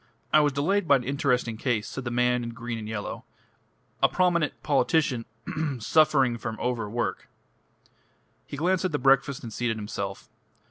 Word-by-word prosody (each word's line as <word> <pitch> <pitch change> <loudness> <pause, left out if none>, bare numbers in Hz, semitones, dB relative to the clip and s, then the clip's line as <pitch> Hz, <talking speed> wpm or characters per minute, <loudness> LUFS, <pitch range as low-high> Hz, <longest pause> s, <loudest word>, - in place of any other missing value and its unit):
"I - - +8
was 150 -1 +3
delayed 170 +7 +1
by 140 - +6
an 130 - 0
interesting 125 -4 0
case," 115 -3 -1
said 135 - -6
the - - -1
man 125 0 +2
in 115 0 -6
green 120 -1 -5
and 110 0 -7
yellow. 105 -2 -5 0.8
"A - - +5
prominent 175 -4 +1
politician 135 -3 +1 0.2
ahem! 155 -5 -2
suffering 135 -2 +3
from 110 -1 -5
overwork." 120 -2 -2 1.2
He 140 - -7
glanced 180 +4 +1
at 185 - -1
the - - +2
breakfast 135 0 +2
and 115 -3 -7
seated 120 -1 -1
himself. 100 -2 -5
125 Hz, 165 wpm, -26 LUFS, 115-150 Hz, 1.2 s, I